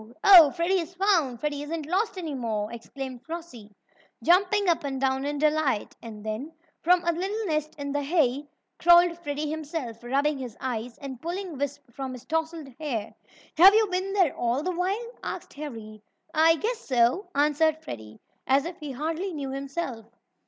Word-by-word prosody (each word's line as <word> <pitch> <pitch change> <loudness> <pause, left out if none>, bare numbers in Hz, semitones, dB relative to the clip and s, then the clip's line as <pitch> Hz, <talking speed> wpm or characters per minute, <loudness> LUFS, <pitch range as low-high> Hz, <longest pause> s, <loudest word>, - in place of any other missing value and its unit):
"Oh, 355 -7 +10
Freddie 360 +4 +1
is 345 +1 -6
found! 345 - +2
Freddie 290 +1 -2
isn't 310 +1 -4
lost 380 +6 0
any 325 -5 -4
more!" 225 -4 -3
exclaimed 255 +1 -7
Flossie, 320 -11 -8 0.5
jumping 390 +3 +3
up 335 -3 +2
and 270 -2 -3
down 265 0 0
in 290 0 -2
delight. 300 -6 +1
And 215 -2 -9
then, 230 +9 -4 0.3
from 355 +1 +4
a 340 - +3
little 390 +6 -3
nest 310 -3 -2
in 285 -1 -4
the 290 +1 0
hay, 285 -2 +1 0.3
crawled 345 0 +6
Freddie 295 -2 -3
himself, 300 -7 -5
rubbing 280 +4 0
his 245 -4 -7
eyes, 245 -2 -4
and 265 -3 -8
pulling 350 0 -4
wisps 275 -2 -5
from 265 0 -5
his 250 - -10
tousled 320 -2 -2
hair. 235 -9 -3 0.4
"Have 385 +5 +9
you 440 0 +5
been 370 +2 -1
there 370 -7 +2
all 240 +4 0
the 365 - -1
while?" 390 +7 -2
asked - - -6
Harry. 225 -8 -8 0.3
"I 325 +1 +6
I - - -1
guess 450 +7 -2
so," 260 - +1
answered 300 +2 +3
Freddie, 110 -2 -9 0.3
as 275 +2 +3
if 345 +1 -6
he 295 -4 -6
hardly 325 +7 -3
knew 275 -2 -4
himself. 275 -4 -5
300 Hz, 175 wpm, -26 LUFS, 260-345 Hz, 0.5 s, Oh